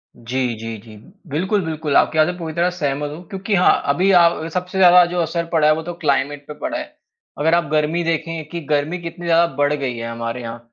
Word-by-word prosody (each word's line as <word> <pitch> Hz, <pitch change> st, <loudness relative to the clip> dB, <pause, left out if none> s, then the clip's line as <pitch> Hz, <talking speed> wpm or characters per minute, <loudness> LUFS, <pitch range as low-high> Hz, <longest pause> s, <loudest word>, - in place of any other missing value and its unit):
जी, 125 Hz, +1 st, -2 dB
जी, 115 Hz, 0 st, -6 dB
जी। 110 Hz, +1 st, -14 dB, 0.3 s
बिल्कुल, 190 Hz, +8 st, 0 dB
बिल्कुल, 155 Hz, -2 st, -2 dB
आपकी 160 Hz, -, +2 dB
बात 155 Hz, -, +5 dB
से 180 Hz, 0 st, -3 dB
पूरी 160 Hz, -2 st, -5 dB
तरह 170 Hz, +2 st, +1 dB
सहमत 145 Hz, -4 st, -2 dB
हूँ। 175 Hz, -, -11 dB
क्योंकि 195 Hz, +2 st, -2 dB
हाँ, 180 Hz, -, +4 dB
अभी 175 Hz, +8 st, +2 dB
अ, 170 Hz, -3 st, +4 dB
सबसे 180 Hz, +1 st, -3 dB
ज़्यादा 180 Hz, -1 st, +7 dB
जो 175 Hz, +1 st, -3 dB
असर 170 Hz, +1 st, -2 dB
पड़ा 155 Hz, -2 st, +3 dB
है 155 Hz, -, +6 dB
वो 160 Hz, -, -4 dB
तो 175 Hz, +1 st, -5 dB
क्लाइमेट 140 Hz, 0 st, 0 dB
पे 150 Hz, -, -7 dB
पड़ा 310 Hz, -1 st, -3 dB
है। 305 Hz, 0 st, -8 dB, 0.4 s
अगर 160 Hz, +3 st, +2 dB
आप 170 Hz, -, +2 dB
गर्मी 155 Hz, +3 st, +1 dB
देखें 165 Hz, -1 st, -2 dB
कि 170 Hz, -, -5 dB
गर्मी 150 Hz, +4 st, 0 dB
कितनी 170 Hz, +1 st, -7 dB
ज़्यादा 170 Hz, 0 st, +4 dB
बढ़ 145 Hz, +1 st, +2 dB
गई 135 Hz, -4 st, -2 dB
है 115 Hz, 0 st, -5 dB
हमारे 115 Hz, +1 st, -4 dB
यहाँ, 115 Hz, 0 st, -7 dB
160 Hz, 230 wpm, -20 LUFS, 145-175 Hz, 0.4 s, ज़्यादा